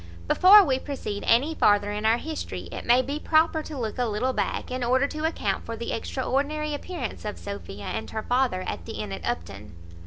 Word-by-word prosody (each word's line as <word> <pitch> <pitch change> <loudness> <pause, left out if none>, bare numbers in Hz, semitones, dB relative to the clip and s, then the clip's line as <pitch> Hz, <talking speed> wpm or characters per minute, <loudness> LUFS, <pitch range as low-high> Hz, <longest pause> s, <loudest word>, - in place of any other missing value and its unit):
Before 400 +3 +8
we 265 -2 +1
proceed 260 -8 -5
any 265 +8 +4
farther 205 -7 +3
in 210 +1 -1
our 225 +1 +4
history, 315 +4 -5
it - - -7
may 245 +2 +5
be 285 +4 -3
proper 315 0 +3
to 305 -1 -8
look 225 -1 -4
a 245 - +2
little 230 +5 -1
back, - - -2
in 255 0 -2
order 260 +3 +3
to 305 +2 -3
account 210 -11 -1
for 230 - -5
the 235 - -4
extraordinary 285 +5 -1
appearance 290 -4 -5
of 210 -1 -4
Sophia 200 - -7
and 220 - -4
her 220 -1 -4
father 245 -7 +1
at 85 - -5
the - - -5
inn 105 -2 -5
at 95 - -6
Upton. 100 +3 -5
245 Hz, 210 wpm, -26 LUFS, 210-290 Hz, -, Before